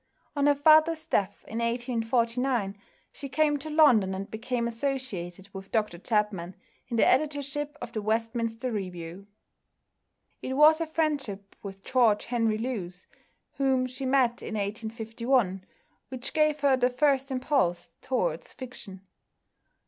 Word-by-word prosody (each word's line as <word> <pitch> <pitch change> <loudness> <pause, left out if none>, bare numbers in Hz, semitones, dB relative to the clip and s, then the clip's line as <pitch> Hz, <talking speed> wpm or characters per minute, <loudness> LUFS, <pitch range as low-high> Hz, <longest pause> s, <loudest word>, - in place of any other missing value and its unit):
On 285 0 +2
her 290 - +5
father's 315 +2 +5
death, 205 -11 -1
in 225 - -4
1849, 235 -1 0 0.4
she 275 - -8
came 295 +2 +2
to 310 +3 -7
London 245 -12 +4
and 195 +2 -6
became 235 +2 -2
associated 225 -8 -4
with 195 0 -9
Dr 210 -6 -1
Chapman 200 -4 -1 0.3
in 235 - -3
the - - +5
editorship 290 0 0
of 240 - -7
the 220 - -3
Westminster 225 +2 -1
Review. 180 -2 -6 1.1
It 260 - -4
was 305 +3 +6
her 330 - -2
friendship 280 -12 -2
with 195 -1 -9
George 235 -5 +3
Henry 230 -3 0
Lewes, 195 -7 -4 0.5
whom 265 -2 +2
she 255 +1 -5
met 255 -3 +2
in 220 - -5
1851, 225 0 -1 0.5
which 255 -1 -6
gave 305 -1 +2
her 280 -2 +4
the 250 -1 +2
first 270 +1 +1
impulse 255 - 0
towards 270 - -2
fiction. 235 -7 -9
240 Hz, 135 wpm, -28 LUFS, 210-275 Hz, 1.1 s, was